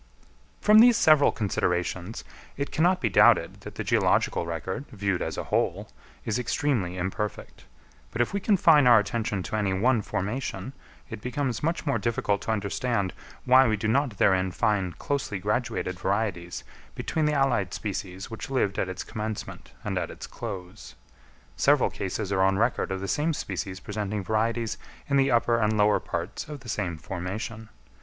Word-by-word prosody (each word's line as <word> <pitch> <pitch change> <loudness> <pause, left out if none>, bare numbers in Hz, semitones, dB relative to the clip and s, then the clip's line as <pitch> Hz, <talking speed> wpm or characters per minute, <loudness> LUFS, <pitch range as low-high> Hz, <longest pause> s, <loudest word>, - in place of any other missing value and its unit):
_ - - -26
From 210 +1 +7
these 240 0 +7
several 155 -9 +5
considerations 90 -1 -2 0.3
it 140 +1 -3
cannot 180 +3 +2
be 120 - +2
doubted 95 - +4
that - - -9
the - - -3
geological 85 - +2
record, 85 - -4
viewed 100 -6 -1
as - - -3
a - - -2
whole, - - -1 0.4
is 115 +2 0
extremely 115 -7 -1
imperfect; 95 +3 -4 0.4
but 115 - -7
if 120 - +1
we 200 - 0
confine 165 - +5
our 120 -2 +8
attention 105 -2 -1
to 110 - -4
any 100 -3 0
one 115 +4 +2
formation, 125 +7 -4 0.4
it - - -6
becomes 125 -1 -2
much 165 +2 -1
more 140 - +1
difficult 105 -3 0
to - - -2
understand 100 -1 -1 0.3
why 130 +1 +6
we 110 -1 +1
do 105 - -2
not 125 -1 +1
therein 95 -1 +3
find 95 -1 0
closely 140 -8 -2
graduated 105 -2 -2
varieties 95 -3 -2 0.3
between 160 -1 -1
the 150 - +2
allied 135 -9 +1
species 95 -2 -5
which 110 - -6
lived 115 -7 0
at 95 - -1
its 95 -1 -5
commencement 110 0 -6
and - - -1
at - - -3
its - - -8
close. 100 -3 -8 0.6
Several - - +3
cases 100 +1 -4
are 95 -1 +2
on 95 0 +3
record 115 -2 0
of 95 0 -3
the 95 - -3
same 155 +9 0
species 95 -9 -4
presenting 105 0 -4
varieties 115 +2 -1 0.3
in 140 - +2
the 135 0 +3
upper 120 -1 +3
and 110 -1 +1
lower 105 0 +4
parts - - -5
of 150 -2 -7
the 120 - -10
same 95 -6 -2
formation. 105 +5 -5
110 Hz, 170 wpm, -26 LUFS, 95-130 Hz, 0.6 s, our